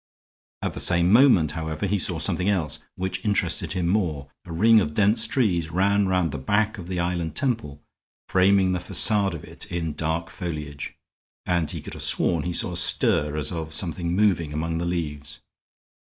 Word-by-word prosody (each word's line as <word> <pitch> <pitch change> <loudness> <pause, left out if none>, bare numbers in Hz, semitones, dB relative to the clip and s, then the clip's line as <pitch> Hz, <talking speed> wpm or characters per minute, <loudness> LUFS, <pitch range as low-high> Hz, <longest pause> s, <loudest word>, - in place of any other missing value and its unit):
At - - -2
the - - -6
same 85 0 +3
moment, 115 - +5
however, 80 +2 -4
he 100 +1 0
saw - - 0
something 90 +3 0
else, 90 -7 -1 0.2
which 95 +2 -4
interested 100 -7 -1
him 90 -3 -1
more. 80 -8 -1
A 90 - -10
ring 110 +7 +5
of 75 -6 -2
dense 110 +2 +3
trees 90 -11 0
ran 100 +4 +2
round 90 -4 +1
the 75 - -5
back 105 +9 0
of 85 - -8
the 90 -1 -3
island 85 -2 -2
temple, 115 - -2 0.4
framing 95 0 +3
the 90 - -1
facade 95 +1 +1
of 80 - -9
it - - -9
in 85 -3 -2
dark 80 +2 -3
foliage, 75 -6 -6 0.5
and 85 -4 0
he - - -5
could - - -9
have - - -8
sworn 85 -2 +1
he 90 - -1
saw 90 - +1
a 90 - -3
stir 75 -3 +2
as 75 - -2
of 80 -2 -5
something 85 0 -3
moving 90 -7 +1
among 80 +2 -2
the 85 - -2
leaves. 75 -5 -4
85 Hz, 185 wpm, -24 LUFS, 80-100 Hz, 0.5 s, moment